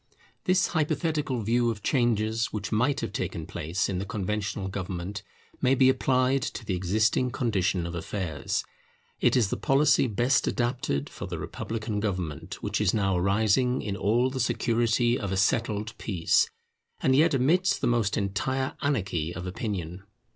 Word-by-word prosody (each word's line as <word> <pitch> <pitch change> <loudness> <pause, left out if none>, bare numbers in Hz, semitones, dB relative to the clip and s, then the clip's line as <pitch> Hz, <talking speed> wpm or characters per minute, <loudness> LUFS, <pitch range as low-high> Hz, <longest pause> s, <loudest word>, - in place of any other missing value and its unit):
This 185 0 +3
hypothetical 150 -5 0
view 120 +2 +2
of 105 -3 -4
changes 115 -3 +1
which 105 -1 -5
might 125 +6 +1
have - - -4
taken - - -3
place 85 +5 -2
in 95 -2 -2
the - - -2
Conventional 100 -1 -3
government, 95 +1 -4 0.4
may 130 0 +4
be 130 0 +5
applied 130 0 +2
to 120 - -5
the 100 - -1
existing 110 +7 +1
condition 95 -8 0
of 85 - -5
affairs. 85 -3 -3 0.6
It - - +3
is 115 -6 +2
the - - -1
policy 135 0 +3
best 120 +4 +2
adapted 120 - -1
for - - -7
the - - -4
republican 110 -2 -4
government 90 -8 -4
which - - -1
is 105 -1 +2
now 95 -3 +1
arising 110 +7 +2
in 100 -2 -3
all 120 +6 +2
the 130 - -4
security 120 0 +1
of 100 -2 -3
a 95 - 0
settled 105 +2 0
peace, 90 -6 +2 0.5
and 130 - +3
yet 155 +1 +4
amidst 175 +9 +2
the - - -1
most 115 -4 +1
entire 130 +7 -1
anarchy 90 - -1
of 90 +1 -5
opinion. 90 -2 -4
110 Hz, 160 wpm, -27 LUFS, 95-130 Hz, 0.6 s, be